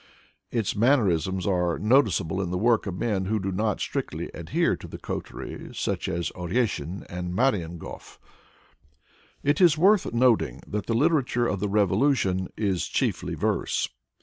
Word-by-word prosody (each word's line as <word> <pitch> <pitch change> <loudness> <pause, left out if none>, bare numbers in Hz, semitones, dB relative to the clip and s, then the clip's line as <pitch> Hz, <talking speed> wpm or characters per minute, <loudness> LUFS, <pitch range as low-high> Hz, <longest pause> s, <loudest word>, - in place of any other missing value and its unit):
Its 115 -5 -1
man 120 +7 +5
nerisms 95 - 0
are 90 -3 +1
noticeable 100 - +2
in 90 - -2
the 90 - -1
work 115 +2 +2
of 90 -2 -4
men 100 -3 -1
who 110 +3 0
do 95 0 -2
not 105 +2 0
strictly - - -3
adhere - - 0
to - - -10
the - - -8
coterie, - - -6
such - - -2
as 85 -2 -2
Oreshin 90 - -2
and 90 0 -5
Marienhof. 90 -9 -2 1.3
It 145 +6 +2
is 170 -4 +6
worth 195 +4 +4
noting 120 -1 +2
that 105 -1 -4
the 115 - 0
literature 135 -3 +2
of 100 - -1
the 105 +1 -1
revolution 100 -1 +2
is 100 -5 0
chiefly - - -1
verse. - - 0
100 Hz, 150 wpm, -26 LUFS, 90-120 Hz, 1.3 s, is